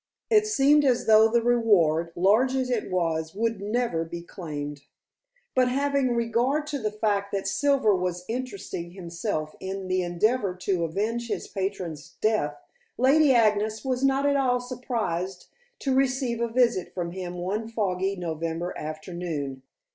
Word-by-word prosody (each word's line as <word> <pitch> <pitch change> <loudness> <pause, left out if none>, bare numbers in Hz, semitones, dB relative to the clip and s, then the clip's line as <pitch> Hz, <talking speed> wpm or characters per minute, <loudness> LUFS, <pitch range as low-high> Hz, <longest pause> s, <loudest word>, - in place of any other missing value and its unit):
It 425 -1 +5
seemed 295 -6 +4
as 255 -3 +2
though 220 0 +7
the 235 +1 +1
reward, 185 -9 +3
large 220 +9 +3
as 260 -1 0
it 235 -3 -1
was, 165 -2 -1
would 225 -1 -1
never 210 -5 0
be 170 +1 -7
claimed. 145 -5 -6 0.7
But 255 -1 +3
having 275 -1 +1
regard 235 +6 +1
to 285 - -1
the 215 -3 -1
fact 205 -2 -1
that 195 -1 -1
Silver 245 +2 +3
was 180 -1 -2
interesting 205 -8 -5
himself 170 -3 -4
in 190 0 -5
the 185 0 +1
endeavor 190 +3 +1
to 180 -2 -1
avenge 220 +8 -2
his 220 - -3
patron's 175 -5 -4
death, 215 -10 +1 0.4
Lady 280 +3 +5
Agnes 215 -1 +2
was 260 0 -1
not 275 +1 +3
at 285 0 +3
all 250 -2 +2
surprised 230 -8 -3 0.3
to 270 - 0
receive 260 -3 +1
a 235 - +1
visit 235 -5 +1
from 175 -2 -3
him 180 -1 -6
one 195 +5 -3
foggy 195 -4 -1
November 165 0 -3
afternoon. 155 -3 -5
210 Hz, 150 wpm, -26 LUFS, 175-245 Hz, 0.7 s, though